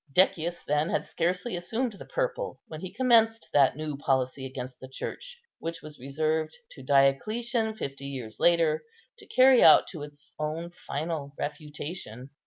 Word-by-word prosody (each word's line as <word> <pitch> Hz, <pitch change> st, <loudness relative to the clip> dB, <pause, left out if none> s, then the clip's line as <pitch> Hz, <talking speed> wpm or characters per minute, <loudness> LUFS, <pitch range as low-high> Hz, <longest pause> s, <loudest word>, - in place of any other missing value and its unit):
Decius 175 Hz, +1 st, +2 dB
then 150 Hz, +3 st, +1 dB
had -, -, 0 dB
scarcely 180 Hz, +6 st, -1 dB
assumed 225 Hz, +7 st, -2 dB
the 195 Hz, -, -11 dB
purple, -, -, -2 dB
when 155 Hz, -1 st, -8 dB
he 185 Hz, -, -6 dB
commenced 225 Hz, -1 st, +3 dB
that 140 Hz, -3 st, +5 dB
new 155 Hz, -1 st, -4 dB
policy 135 Hz, -2 st, 0 dB
against 130 Hz, -1 st, -7 dB
the 130 Hz, -, -9 dB
Church 485 Hz, -, -7 dB, 0.2 s
which 165 Hz, 0 st, -5 dB
was 155 Hz, -1 st, -10 dB
reserved 155 Hz, +4 st, -1 dB
to -, -, -11 dB
Diocletian, 220 Hz, -, +2 dB
fifty 140 Hz, -6 st, -5 dB
years 125 Hz, -6 st, -7 dB
later, 165 Hz, -3 st, +3 dB, 0.4 s
to -, -, -13 dB
carry 260 Hz, -, +6 dB
out -, -, +8 dB
to 160 Hz, -, -7 dB
its 145 Hz, 0 st, -11 dB
own 160 Hz, +3 st, -3 dB, 0.2 s
final 145 Hz, -1 st, -3 dB
refutation. 145 Hz, -4 st, -6 dB
155 Hz, 155 wpm, -28 LUFS, 140-215 Hz, 0.4 s, out